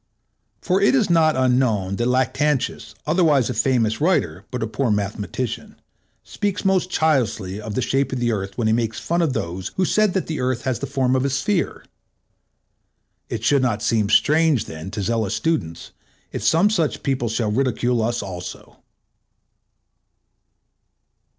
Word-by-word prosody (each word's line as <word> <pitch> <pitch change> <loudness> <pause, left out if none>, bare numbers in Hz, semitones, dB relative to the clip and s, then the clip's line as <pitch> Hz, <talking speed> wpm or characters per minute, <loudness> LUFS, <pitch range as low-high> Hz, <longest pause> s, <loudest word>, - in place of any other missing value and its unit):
For 190 +1 +1
it 205 - +4
is 220 -9 +2
not 160 -2 +4
unknown 125 -7 +1
that 120 - 0
Lactantius, 130 -2 0
otherwise 150 -7 +3
a - - -3
famous 115 -1 +1
writer 100 - 0
but 125 -3 -3
a - - -1
poor 125 +3 -1
mathematician, 105 +3 -3 0.5
speaks 205 -1 -3
most 190 -2 +2
childishly 115 - 0
of 105 -1 -6
the 130 - 0
shape 135 +3 0
of 130 - -2
the 120 -1 +1
Earth 95 -2 -4
when 120 - -1
he 110 - +3
makes 115 -1 -1
fun 170 +1 0
of 155 -6 +1
those 90 -4 -4
who 190 - +1
said 215 +1 +2
that 190 - 0
the 160 - -4
Earth 125 -1 -1
has 130 -3 -1
the 140 - -4
form 130 -2 +1
of 130 - +1
a 140 - +1
sphere. 140 +6 -1 1.4
It 110 -1 -4
should 140 +2 +3
not 120 -4 0
seem 110 -3 +1
strange 155 -2 +3
then 80 +2 -8
to 100 0 -4
zealous 110 -1 0
students, 115 - -2 0.4
if - - -4
some 180 +6 +4
such 165 -9 -1
people 130 -4 -1
shall 110 -1 -1
ridicule 120 0 0
us 120 0 -1
also. 90 -2 -8
125 Hz, 165 wpm, -22 LUFS, 110-155 Hz, 1.4 s, it